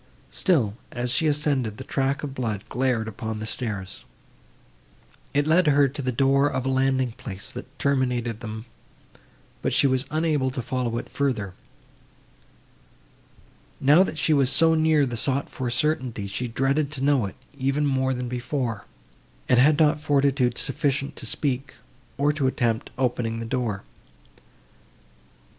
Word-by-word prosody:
Still, 135 Hz, -, +2 dB, 0.2 s
as 125 Hz, 0 st, -2 dB
she 155 Hz, +5 st, +2 dB
ascended, 145 Hz, -7 st, 0 dB
the -, -, -7 dB
track 135 Hz, +1 st, -1 dB
of 140 Hz, -2 st, -4 dB
blood 110 Hz, -6 st, -3 dB
glared 125 Hz, -3 st, 0 dB
upon 110 Hz, 0 st, -5 dB
the 110 Hz, -, -5 dB
stairs. 105 Hz, -5 st, -4 dB, 1.3 s
It 145 Hz, 0 st, +1 dB
led 165 Hz, +2 st, +4 dB
her 145 Hz, -1 st, +5 dB
to 145 Hz, +2 st, -6 dB
the 130 Hz, -1 st, -1 dB
door 135 Hz, +3 st, +3 dB
of 130 Hz, -3 st, -2 dB
a -, -, +1 dB
landing 130 Hz, -1 st, +1 dB
place, 100 Hz, -3 st, -6 dB
that 135 Hz, +2 st, -10 dB
terminated 125 Hz, -5 st, 0 dB
them, 110 Hz, -1 st, -6 dB, 1.0 s
but -, -, 0 dB
she -, -, +4 dB
was 130 Hz, 0 st, +2 dB
unable 155 Hz, -4 st, +1 dB
to 130 Hz, 0 st, -4 dB
follow 125 Hz, -2 st, -2 dB
it -, -, -5 dB
farther. 110 Hz, -9 st, -1 dB, 2.3 s
Now 145 Hz, +6 st, +6 dB
that 190 Hz, -4 st, 0 dB
she 155 Hz, +1 st, +2 dB
was 135 Hz, -3 st, +4 dB
so 160 Hz, +4 st, +4 dB
near 155 Hz, -2 st, +3 dB
the 120 Hz, -3 st, -4 dB
sought 135 Hz, +3 st, -1 dB
for 130 Hz, -2 st, -3 dB
certainty, 125 Hz, -5 st, 0 dB
she 100 Hz, +6 st, -3 dB
dreaded 135 Hz, +5 st, 0 dB
to 135 Hz, -, -5 dB
know 140 Hz, -7 st, +3 dB
it, 95 Hz, -, -10 dB, 0.2 s
even 140 Hz, +3 st, +1 dB
more 130 Hz, -1 st, +1 dB
than 125 Hz, 0 st, -3 dB
before, 125 Hz, -3 st, -3 dB, 0.6 s
and 125 Hz, -, +4 dB
had 145 Hz, +3 st, +5 dB
not 150 Hz, -1 st, +4 dB
fortitude 140 Hz, -4 st, +2 dB
sufficient 140 Hz, 0 st, -1 dB
to -, -, -4 dB
speak, 135 Hz, -2 st, -1 dB, 0.4 s
or 145 Hz, +1 st, +2 dB
to 145 Hz, -3 st, 0 dB
attempt 115 Hz, -3 st, 0 dB
opening 120 Hz, -3 st, -1 dB
the 115 Hz, -, -4 dB
door. 115 Hz, -5 st, -2 dB
130 Hz, 150 wpm, -25 LUFS, 120-145 Hz, 2.3 s, Now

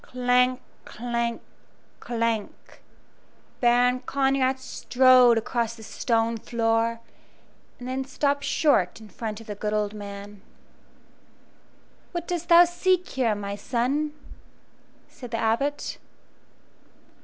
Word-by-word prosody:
Clank! 250 Hz, 0 st, +1 dB, 0.2 s
clank! 235 Hz, 0 st, -3 dB, 0.6 s
clank! 230 Hz, -3 st, -3 dB, 0.8 s
Baron 245 Hz, +1 st, +3 dB
Conrad 270 Hz, -1 st, +1 dB
strode 255 Hz, -2 st, +4 dB
across 230 Hz, 0 st, -2 dB
the 225 Hz, -, -13 dB
stone 230 Hz, +1 st, 0 dB
floor, 230 Hz, 0 st, 0 dB, 0.8 s
and 245 Hz, -, -9 dB
then 260 Hz, +1 st, -2 dB
stopped 285 Hz, +1 st, -1 dB
short 225 Hz, -, +2 dB
in 220 Hz, -1 st, -13 dB
front 215 Hz, +1 st, -6 dB
of -, -, -13 dB
the 210 Hz, -, -5 dB
good 210 Hz, +1 st, -3 dB
old 210 Hz, -1 st, -1 dB
man. 200 Hz, -1 st, -9 dB, 1.7 s
"What 345 Hz, -1 st, -4 dB
dost 345 Hz, -1 st, -3 dB
thou 345 Hz, +1 st, +8 dB
seek 360 Hz, +1 st, 0 dB
here, 240 Hz, -5 st, 0 dB
my 200 Hz, 0 st, -5 dB
son?" 270 Hz, +8 st, -1 dB, 0.9 s
said 245 Hz, -, -11 dB
the 230 Hz, -, -3 dB
Abbot. 255 Hz, +7 st, -1 dB
240 Hz, 110 wpm, -25 LUFS, 225-265 Hz, 1.7 s, thou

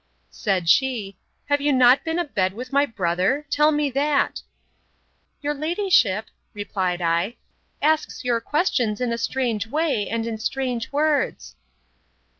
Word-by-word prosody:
—Said 185 Hz, -4 st, -1 dB
she, 220 Hz, -2 st, +2 dB, 0.3 s
Have 285 Hz, 0 st, +1 dB
you 290 Hz, +1 st, +2 dB
not 255 Hz, 0 st, +5 dB
been 325 Hz, 0 st, -2 dB
a 350 Hz, -, +1 dB
bed 190 Hz, -10 st, -1 dB
with 250 Hz, +5 st, -8 dB
my 280 Hz, +1 st, +3 dB
brother? 195 Hz, -, 0 dB
tell 300 Hz, +1 st, +4 dB
me 295 Hz, -2 st, 0 dB
that. 280 Hz, +2 st, +1 dB, 1.0 s
Your 295 Hz, 0 st, -1 dB
ladyship, 305 Hz, -, +1 dB, 0.3 s
replied 185 Hz, -3 st, -2 dB
I, 170 Hz, +7 st, 0 dB, 0.5 s
asks 310 Hz, -1 st, +1 dB
your 240 Hz, -2 st, 0 dB
questions 245 Hz, -, 0 dB
in 245 Hz, -2 st, -1 dB
a -, -, -2 dB
strange 230 Hz, -5 st, -1 dB
way, 290 Hz, -6 st, 0 dB
and 230 Hz, 0 st, -2 dB
in 225 Hz, -1 st, -4 dB
strange 250 Hz, 0 st, -2 dB
words. 295 Hz, 0 st, 0 dB
250 Hz, 140 wpm, -23 LUFS, 210-290 Hz, 1.0 s, not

